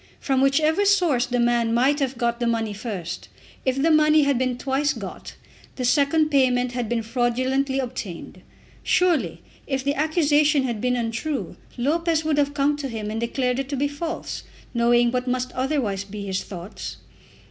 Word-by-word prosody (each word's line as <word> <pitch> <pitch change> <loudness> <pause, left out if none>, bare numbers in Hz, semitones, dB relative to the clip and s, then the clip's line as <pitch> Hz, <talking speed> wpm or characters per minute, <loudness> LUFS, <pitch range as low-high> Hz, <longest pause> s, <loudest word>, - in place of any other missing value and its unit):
From 265 -2 +1
whichever 310 +7 +3
source 350 -11 +3
the 245 0 -1
man 235 -1 +2
might 270 +5 +3
have 270 -2 -1
got 235 0 0
the 240 - 0
money 225 -2 0
first, 200 -5 -6 0.4
if 260 +1 +1
the 325 +4 +3
money 305 0 +5
had 280 -3 +2
been 255 -1 0
twice 275 +3 0
got, - - -8 0.4
the 255 - -2
second 290 +4 +3
payment 250 -3 +2
had 245 -3 -3
been 235 -1 0
fraudulently 255 +3 0
obtained. 235 -9 -5 0.4
Surely 255 - +1 0.2
if 270 -2 -1
the 280 +1 +1
accusation 300 -1 +3
had 235 -5 -2
been 250 0 +1
untrue 240 +5 -3 0.2
Lopez 320 +5 +1
would 305 -2 +1
have 285 0 +1
come 290 +1 +2
to 280 -2 -4
him 215 -3 -4
and 225 +1 -3
declared 250 +2 0
it 270 -1 -3
to 285 - -2
be 285 +2 +1
false, 320 +4 -5 0.3
knowing 240 0 +3
what 250 0 -2
must 255 0 -1
otherwise 255 -8 -1
be 200 0 -7
his 190 -1 -2
thoughts. 185 +2 -8
260 Hz, 175 wpm, -23 LUFS, 235-290 Hz, 0.4 s, money